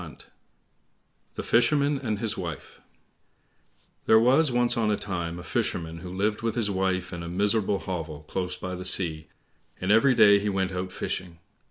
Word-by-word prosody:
19 - - -10 1.2
The - - -4
Fisherman 140 +4 +2
and 110 -6 -2
His 110 0 -2
Wife 85 -5 -7 1.3
There 110 - +7
was 130 +5 +4
once 120 0 +2
on 115 -3 +1
a 105 - +1
time 85 -4 -4
a 90 - -8
Fisherman 85 -1 -3
who 90 +2 -8
lived 105 +3 -1
with 115 -1 -2
his 110 -4 0
wife 95 -1 -1
in 85 - -5
a 85 - -6
miserable 100 +2 +1
hovel 80 -5 -5
close 90 +3 -4
by 90 0 -5
the 90 0 -6
sea, 85 -4 +1 0.5
and 95 +2 0
every 125 +4 +5
day 105 -3 +6
he 105 +1 -2
went 95 -1 -1
out 90 0 -4
fishing. 90 -2 -4
95 Hz, 175 wpm, -26 LUFS, 90-110 Hz, 1.3 s, There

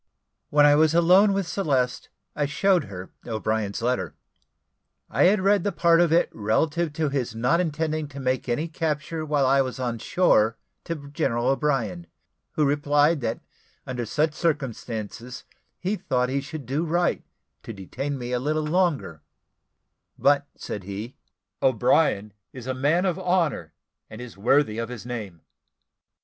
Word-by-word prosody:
When 145 0 +5
I 145 - +7
was 155 +2 +4
alone 180 +5 +6
with 195 -1 0
Celeste, 135 -10 -1 0.3
I 145 -1 0
showed 180 +2 +2
her 95 -2 -9 0.2
O'Brien's 110 -1 -2
letter. 120 - -1 1.0
I - - +3
had 190 +2 +4
read 200 -1 +3
the 205 - 0
part 170 -1 +4
of 170 -2 +3
it 170 +1 +4
relative 150 +10 0
to 155 -1 0
his 130 -5 -2
not 125 +9 +2
intending 155 -2 -1
to 140 -1 -10
make 130 -1 -1
any 145 +8 0
capture 155 +1 -3
while 145 -3 +1
I 135 +1 +4
was 130 -1 -4
on 120 -2 -2
shore 115 -9 +2 0.3
to 155 -4 -5
General 120 -3 0
O'Brien, 120 - -1 0.5
who 150 - +2
replied, 145 +2 +2
that 115 -1 -2 0.4
"under 125 -3 -4
such 150 +6 +1
circumstances 125 -6 -3 0.3
he 195 +4 -2
thought 125 -6 0
he 140 +1 -1
should 150 0 -8
do 140 +7 -1
right 175 +1 0 0.4
to - - -8
detain 130 +8 -5
me 125 -1 -5
a 125 - 0
little 155 +4 -1
longer; 155 - 0 1.0
but," 145 0 +3
said 105 - -6
he, 105 +6 -6 0.5
"O'Brien 105 -4 +2 0.2
is 125 -3 -9
a 130 - -2
man 145 +8 +1
of 185 -1 0
honour 170 - 0 0.3
and 110 - -10
is 125 -2 -9
worthy 115 +2 +2
of 115 0 -3
his 120 -4 -8
name." 105 -9 -6
140 Hz, 155 wpm, -25 LUFS, 120-160 Hz, 1.0 s, I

